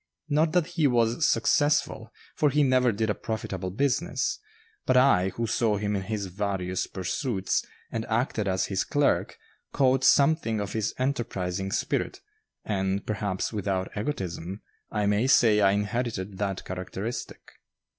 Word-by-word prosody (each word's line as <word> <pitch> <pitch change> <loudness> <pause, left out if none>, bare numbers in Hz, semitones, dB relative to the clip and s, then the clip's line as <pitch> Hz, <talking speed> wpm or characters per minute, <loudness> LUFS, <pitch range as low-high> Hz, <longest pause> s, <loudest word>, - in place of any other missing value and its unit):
Not 155 +2 +2
that 180 -3 +3
he 165 -3 +1
was 120 +3 +2
successful, 145 0 +1 0.2
for 150 - +3
he 145 +2 +3
never 130 -2 +3
did 110 +1 0
a - - +1
profitable 95 -4 -4
business; 130 +4 0 0.5
but 130 - +4
I, 100 -8 +4
who 115 - -1
saw 110 -1 +1
him 105 0 -1
in 95 - -1
his 105 +1 -3
various 95 -1 -2
pursuits, 95 +2 -1 0.3
and 115 - -2
acted 110 -2 0
as 95 -1 +1
his 95 0 -1
clerk, 145 +2 +1 0.3
caught 130 -1 +2
something 140 -5 +4
of 100 -1 -4
his 110 -1 -1
enterprising 95 -8 -2
spirit, - - -1 0.5
and, 95 -1 -1
perhaps 100 -1 -2
without 95 -3 -2
egotism, 95 - -4 0.3
I 105 -1 -1
may 105 +5 +2
say 110 -5 +5
I 100 - +5
inherited 105 -2 -2
that 100 -2 -2
characteristic. 95 +5 -5
105 Hz, 145 wpm, -27 LUFS, 95-130 Hz, 0.5 s, say